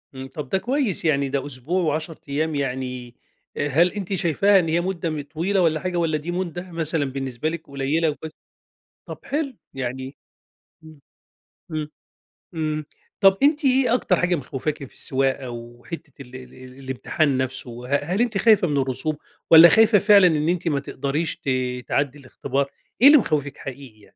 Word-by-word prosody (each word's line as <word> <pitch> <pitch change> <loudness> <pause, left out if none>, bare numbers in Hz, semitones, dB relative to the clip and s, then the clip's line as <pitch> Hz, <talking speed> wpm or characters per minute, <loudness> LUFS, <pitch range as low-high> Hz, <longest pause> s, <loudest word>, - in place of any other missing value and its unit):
إمم، 130 0 -7
طب 150 -4 -6
ده 190 - +1
كويس 240 - -1
يعني 140 -3 +2
ده 140 0 -2
أسبوع 145 +7 -2
و10 155 +1 -2
ايام 155 +2 -1
يعني 125 -3 -4 0.4
آآ 145 - 0
هل 170 +6 +3
أنتِ 200 -2 -4
شايفاها 190 +3 +3
إن 165 - -1
هي 170 +2 +1
مدة 175 -2 -2
م 155 -2 -3
طويلة 165 +7 -1
والّا 160 -2 +2
حاجة 180 0 -3
والّا 160 -2 +1
دي 165 +4 -5
مدة 175 0 -4
مثلًا 160 -3 -1
بالنسبة 135 +1 -3
لِك 165 -1 -7
قليلة 140 +4 0
وك 155 +1 -6 0.8
طب - - -8
حلو 280 -3 -2 0.2
يعني 130 +1 -5 0.7
إمم، 155 -2 -14 0.7
إمم، 155 -1 -3 0.6
إمم، 155 -2 -2 0.3
طب 195 -1 +5
أنتِ 295 0 +3
إيه 260 -2 +3
أكتر 195 -7 +2
حاجة 180 0 +2
مخوفاكِ 145 +2 -4
في 130 - -11
السواقة 135 -1 -1
وحتة 120 +5 -9
ال 125 -1 -12
ال 130 -1 -11
ال 130 +1 -13
الإمتحان 130 +2 -1
نفسه 125 -2 -4
ه 145 - 0
هل 185 +8 -1
أنتِ 235 -4 0
خايفة 210 -4 +4
من 145 -1 -1
الرسوب، 135 +3 -1 0.3
والّا 165 +1 +10
خايفة 220 -2 +5
فعلًا 200 -2 +6
إن 155 0 +1
أنتِ 175 -1 -1
ما 145 -3 +1
تقدريش 140 +4 -3
ت 135 - -5 0.4
تعدّي 140 0 -1
الإختبار 140 +1 -3 0.3
إيه 275 - +9
اللي 300 +1 +9
مخوفِك 145 - -1
حقيقي 135 -1 -8
يعني؟ 105 - -19
155 Hz, 175 wpm, -23 LUFS, 135-175 Hz, 0.8 s, والّا